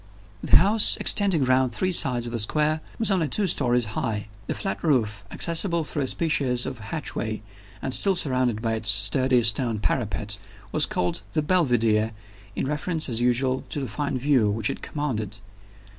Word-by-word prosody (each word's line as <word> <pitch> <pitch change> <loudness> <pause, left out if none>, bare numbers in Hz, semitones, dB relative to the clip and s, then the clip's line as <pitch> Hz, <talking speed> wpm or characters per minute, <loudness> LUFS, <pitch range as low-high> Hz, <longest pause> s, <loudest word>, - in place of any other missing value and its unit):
The - - +2
house 205 +4 +3
extending 195 -8 +4
round 130 -1 +1
three 185 +11 -1
sides 125 -8 +4
of 120 - -6
a 115 - -2
square 150 +8 0 0.2
was 225 -2 0
only 180 -5 +1
two 205 +7 0
stories 125 -8 +1
high. 105 -2 -3 0.2
The - - -3
flat 195 - -5
roof, 110 - 0
accessible 170 - 0
through 150 0 -4
a 135 - -1
species 130 -6 +1
of 130 -3 -6
hatchway, 110 -4 -4 0.4
and 130 - -2
still 195 +5 +3
surrounded 130 -7 -1
by 115 -1 -1
its 110 -1 -2
sturdy 120 +4 +4
stone 115 +1 +1
parapet, 105 -2 -3 0.3
was - - +3
called 90 - -2
"The 155 - 0
Belvidere," 115 -10 +1 0.4
in - - -2
reference 155 +2 -2
as 115 -1 -1
usual 130 +2 0
to - - -3
the 135 - -4
fine 135 +4 -3
view 130 -5 +2
which 110 +1 -1
it - - -8
commanded. 110 -9 -4
130 Hz, 175 wpm, -24 LUFS, 110-155 Hz, 0.4 s, extending